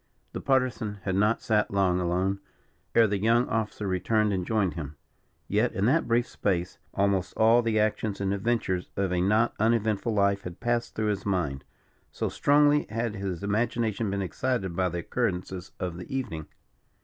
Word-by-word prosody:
The - - -4
Partisan 125 -5 0
had 95 - -1
not 105 +4 +2
sat 105 -2 +2
long 95 -2 +2
alone, 90 +2 0 0.6
ere 115 - +7
the 100 -2 0
young 115 +4 +3
officer 110 -1 -2
returned 105 +3 +1
and 90 -2 -2
joined 105 -5 +1
him; 75 -3 -6 0.5
yet, 110 +4 +1
in 100 - 0
that 150 +8 +2
brief 120 +1 +2
space, 90 -2 -2
almost 100 -2 0
all 115 +2 +5
the 115 -2 +1
actions 105 -1 0
and 100 0 0
adventures 100 -4 -1
of 95 -2 0
a 90 - +1
not 110 +5 +3
uneventful 110 0 +1
life 100 -1 +2
had 90 -1 -8
passed 120 -1 -1
through 110 -1 0
his 100 -2 -2
mind; 85 -9 -1 0.5
so - - -2
strongly 145 +1 +3
had 115 0 -2
his 95 -2 -4
imagination 110 0 0
been 100 0 -1
excited 95 -2 -2
by 90 0 +1
the 85 - -4
occurrences 95 -3 -3
of 90 -2 -3
the 90 - -9
evening. 115 - -3
100 Hz, 175 wpm, -27 LUFS, 95-115 Hz, 0.6 s, ere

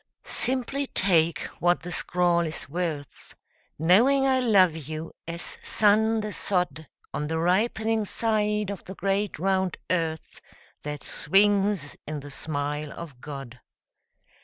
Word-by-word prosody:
Simply 265 +2 -1
take 170 -7 +3 0.2
what 175 0 +2
the 175 - -6
scrawl 175 -1 +1
is 160 -2 -3
worth 155 -2 -5 0.4
Knowing 235 - +5
I 260 -1 +3
love 195 -9 +4
you 155 +1 -6
as 170 +1 -5
sun 220 +1 +3
the 210 0 -4
sod 180 -5 -1 0.3
On 150 - -2
the 160 +1 -1
ripening 220 +5 +1
side 210 -1 0
of 200 - -7
the 190 - -8
great 195 +2 -1
round 190 +1 0
earth 165 -3 -2 0.4
That 150 -1 -5
swings 195 -1 +2
in 150 -1 -4
the 145 +1 -10
smile 145 0 -3
of 145 -7 -9
God. 135 -5 -8
180 Hz, 130 wpm, -26 LUFS, 155-210 Hz, 0.4 s, Knowing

